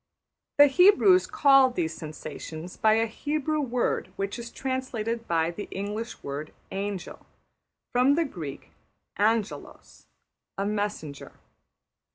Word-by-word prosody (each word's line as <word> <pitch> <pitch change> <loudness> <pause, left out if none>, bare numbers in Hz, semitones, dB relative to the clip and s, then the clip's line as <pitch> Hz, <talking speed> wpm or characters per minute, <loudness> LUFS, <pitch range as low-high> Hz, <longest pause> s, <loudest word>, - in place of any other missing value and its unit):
The 290 - +10
Hebrews 370 +5 +5
called 275 -10 +5
these 160 -2 -1
sensations 155 +2 -8
by 215 -1 +3
a 225 +1 +3
Hebrew 300 +6 -2
word 250 -3 -1
which 195 +4 -3
is 235 0 -7
translated 235 -4 -3
by 165 0 +1
the 205 +4 -7
English 210 +4 -5
word 145 +2 -5 0.2
``angel,'' 195 -2 -5 0.7
from 255 +3 +4
the 335 +1 +2
Greek 160 - -8 0.5
``angelos,'' 220 0 -2 0.5
a 195 - -1
messenger. 205 -9 -4
220 Hz, 115 wpm, -27 LUFS, 180-265 Hz, 0.7 s, The